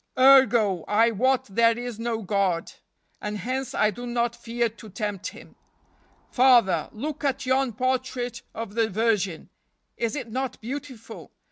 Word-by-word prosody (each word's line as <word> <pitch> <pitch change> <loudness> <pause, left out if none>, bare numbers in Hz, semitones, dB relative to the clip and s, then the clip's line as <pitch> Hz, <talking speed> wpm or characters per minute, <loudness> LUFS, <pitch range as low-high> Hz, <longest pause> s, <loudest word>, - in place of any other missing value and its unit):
Ergo, 245 -9 +5
I 225 +3 +3
wot 255 +4 +1
there 230 +3 +3
is 240 -2 -6
no 230 -1 -2
God, 190 -3 0 0.5
and 210 0 -3
hence 255 +3 -3
I 215 - +3
do 245 +3 -8
not 235 0 -1
fear 235 0 -1
to 220 0 -12
tempt 205 -1 -4
Him. - - -12 0.8
Father, 235 -11 +4
look 295 +7 -5
at 270 -2 -1
yon 260 -1 +1
portrait 250 0 -2
of 225 -3 -6
the 225 0 +1
Virgin. 200 -5 -1 0.5
Is 230 +3 -1
it 250 -6 -6
not 260 +1 -3
beautiful? 260 -1 -8
235 Hz, 145 wpm, -25 LUFS, 215-255 Hz, 0.8 s, Ergo